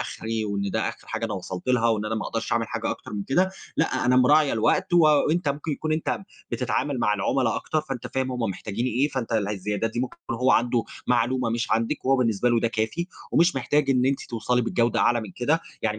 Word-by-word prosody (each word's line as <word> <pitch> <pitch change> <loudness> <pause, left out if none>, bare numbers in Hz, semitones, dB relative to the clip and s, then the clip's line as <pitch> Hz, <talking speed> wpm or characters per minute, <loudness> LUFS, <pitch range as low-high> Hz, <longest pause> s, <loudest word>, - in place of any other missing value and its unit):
آخري 110 0 -3
وإن 100 -1 -2
ده - - 0
آخر - - -9
حاجة 110 +1 -3
أنا 105 -2 -2
وصلت 95 +2 -6
لها 120 -2 +3
وإن 110 -2 +1
أنا 110 +1 -2
ما 110 - -2
أقدرش 115 0 -3
أعمل 115 -1 +1
حاجة - - -2
أكتر - - -7
من 100 -1 -3
كده، 180 - +2 0.3
لأ، 165 - +1
أنا 125 +1 +4
مراعية 145 +3 +5
الوقت، 110 +9 +1
وأنت 155 0 +4
ممكن 145 +2 -2
يكون 155 +2 -2
أنت 155 +1 -1 0.3
بتتعامل 130 +2 -1
مع 105 -3 +2
العملا 115 +4 +1
أكتر، 155 - -1
فأنت 135 -5 -6
فاهم 130 -1 -2
هم 125 - -4
محتاجين 105 +5 -3
إيه، 130 +5 +1
فأنت 130 -4 -4
اله 105 -2 +1
الزيادات 105 +2 -2
دي 120 - -3
ممكن 130 - -4
يكون 120 - -3
هو 125 +2 +2
عنده 120 -1 +2 0.2
معلومة 125 0 +1
مش 115 +2 -2
عندِك، 115 +6 0
وهو 135 +1 +4
بالنسبة 120 -2 +1
له 120 -1 +3
ده 115 - +1
كافي 110 +9 -2 0.3
ومش 170 -2 +4
محتاج 140 +2 +1
إن 130 -1 +3
أنتِ 135 0 +1
توصلي 125 +1 0
بالجودة 115 +1 +1
أعلى 120 -1 +3
من 110 - -7
كده، 150 +7 +1 0.2
يعني 105 0 -1
120 Hz, 225 wpm, -25 LUFS, 110-135 Hz, 0.3 s, مراعية